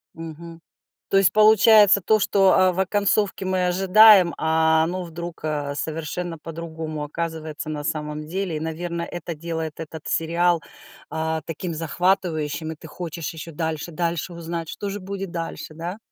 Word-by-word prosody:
Мгм. 165 +1 -9 0.5
То - - +1
есть, 195 -2 +5
получается 215 -1 +6
то, 215 +3 +3
что, 195 -1 +4
а, 185 -1 +4
в 175 - -7
оконцовке 200 +1 +1
мы 185 -1 +1
ожидаем, 190 0 +6
а 160 0 +3
оно 180 +2 -3
вдруг, 170 0 -7
э, 145 -2 -2
совершенно 165 +3 -4
по-другому 160 -1 -6
оказывается 155 0 -5
на 150 -1 -4
самом 150 -1 -3
деле. 185 -1 -2
И, 150 - -4
наверно, 170 +1 -4
это 170 0 -5
делает 160 0 -5
этот 160 -1 -8
сериал, 170 +1 +1 0.5
а, 160 0 -2
таким 165 +1 -4
захватывающим, 160 -2 -1
и - - -9
ты 160 - -12
хочешь 165 -1 -6
ещё 160 +1 -8
дальше, 160 +1 -3
дальше 170 +2 -2
узнать, 170 -1 -5
что 205 - -5
же 200 +1 -5
будет 195 0 -5
дальше, 165 -2 -5
да? 175 +5 -5
165 Hz, 155 wpm, -23 LUFS, 160-185 Hz, 0.5 s, получается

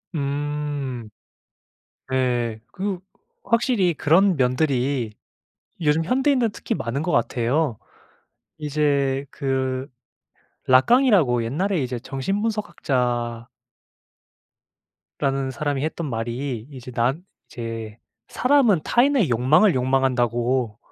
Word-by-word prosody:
음. 145 -4 -3 1.0
네. 120 -4 0
그 190 -1 -3 0.4
확실히 230 -6 +2
그런 175 +6 +3
면들이 130 -3 0 0.7
요즘 160 0 +2
현대인들은 255 - +2
특히 - - -3
많은 120 +5 -3
것 175 - -1
같아요. 120 +2 +1 0.8
이제 140 -3 0
그 130 -1 -2 0.8
라깡이라고 145 - +4
옛날에 170 - -1
이제 125 -2 -3
정신분석학자 130 - -2 1.7
라는 135 -1 0
사람이 140 +1 -2
했던 160 +1 -3
말이 120 +1 -4
이제 130 -2 -9
난 125 +7 0 0.3
이제 115 -2 -6 0.3
"사람은 250 - +3
타인의 245 - +3
욕망을 150 - +4
욕망한다"고. 125 -3 +1
135 Hz, 210 characters per minute, -23 LUFS, 125-165 Hz, 1.7 s, 라깡이라고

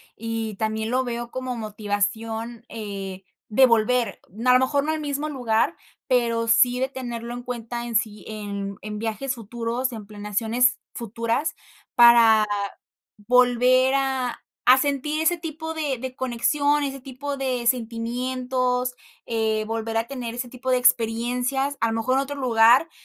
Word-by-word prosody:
y 225 -1 -4
también 220 +1 -2
lo 260 +1 +2
veo 240 -1 -4
como 255 -1 -4
motivación, 220 +2 -3
eh, 195 -3 -6 0.3
de 260 +5 +6
volver, 230 -3 +2 0.3
a 250 - +6
lo 255 - +6
mejor 280 +2 +1
no 310 - 0
al 315 - -2
mismo 290 0 -2
lugar, 235 -6 0 0.3
pero 235 -3 +1
sí 245 +2 +4
de 260 +1 0
tenerlo 240 -3 -6
en 245 0 -6
cuenta 240 -1 -5
en 235 -1 -5
sí, 215 -1 -1
en 200 -2 -5
en 210 0 -6
viajes 230 +4 -2
futuros, 235 +3 -3
en 220 -3 -8
planeaciones 220 +4 0
futuras, 230 +6 -2 0.4
para 230 -2 +7 0.8
volver 250 +1 +4
a 265 -2 -1 0.3
a 255 +1 +8
sentir 290 +2 -1
ese 345 +2 +2
tipo 320 0 -6
de 290 -5 -2
de 255 0 -6
conexión, 285 +4 +1
ese 275 -1 -3
tipo 275 +2 -6
de 255 -3 -1
sentimientos, 250 +1 -1 0.3
eh, 220 -1 0
volver 225 0 -3
a 225 +1 0
tener 245 -4 -5
ese 245 +1 -5
tipo 255 +1 -4
de 255 - +4
experiencias, 250 +4 +1
a 230 - +3
lo - - -2
mejor 225 +3 0
en 270 - +3
otro 280 +1 -5
lugar, 240 +4 +5
240 Hz, 155 wpm, -24 LUFS, 225-260 Hz, 0.8 s, a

